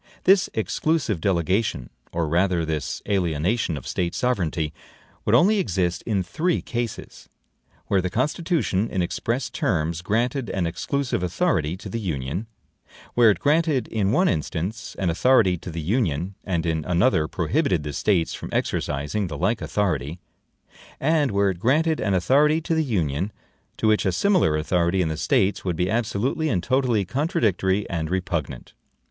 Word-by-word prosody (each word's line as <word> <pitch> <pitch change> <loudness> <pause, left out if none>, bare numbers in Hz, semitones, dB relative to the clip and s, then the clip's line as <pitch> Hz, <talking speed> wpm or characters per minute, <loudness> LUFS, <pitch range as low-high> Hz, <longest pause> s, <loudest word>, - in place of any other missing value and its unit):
This 190 0 +4
exclusive 110 - 0
delegation, 90 - 0 0.2
or 85 -1 -1
rather 85 +1 +1
this 80 -2 -3
alienation, 90 -1 0
of 70 - -9
State 85 -1 -2
sovereignty, 85 -10 -1 0.5
would - - +4
only 205 +4 +5
exist 90 - 0
in 100 -5 +1
three 170 - 0
cases: 120 -2 -5 0.6
where 95 - +2
the 90 - -2
Constitution 130 - 0
in 95 - 0
express 120 +8 -2
terms 80 0 -1
granted 120 +5 -1
an 95 -3 -1
exclusive 135 - -2
authority 85 -2 0
to - - -9
the 115 - -4
Union; 85 - -3 0.7
where 120 -2 +6
it 105 - +3
granted 150 -4 +1
in 105 -3 0
one 185 +11 +3
instance 85 +7 -3
an 90 -4 0
authority 105 0 +4
to 90 - -8
the 85 0 -5 0.2
Union, 90 - -1
and 85 -4 -1
in 80 -2 0
another 90 -2 +2
prohibited 80 +2 0
the 75 -1 -5
States 85 0 +1
from - - -7
exercising 75 +9 -1
the 75 -4 -6
like 95 +8 0
authority; 85 -5 -1 0.8
and 150 -1 +2
where 100 -1 +2
it 90 - -8
granted 155 - +2
an 100 -2 +1
authority 145 - +3
to 165 +1 -2
the 160 0 +2
Union, 90 - -1 0.5
to 110 - +1
which 105 -2 +2
a - - +2
similar 185 - +2
authority 85 +3 +1
in 80 - -1
the 80 - -2
States 95 +5 +1
would 90 -3 -1
be 90 +3 0
absolutely 120 +7 0
and 95 -9 0
totally 125 -6 +1
CONTRADICTORY 105 - 0
and 80 -3 -3
REPUGNANT. 85 -8 -3
95 Hz, 155 wpm, -24 LUFS, 85-120 Hz, 0.8 s, where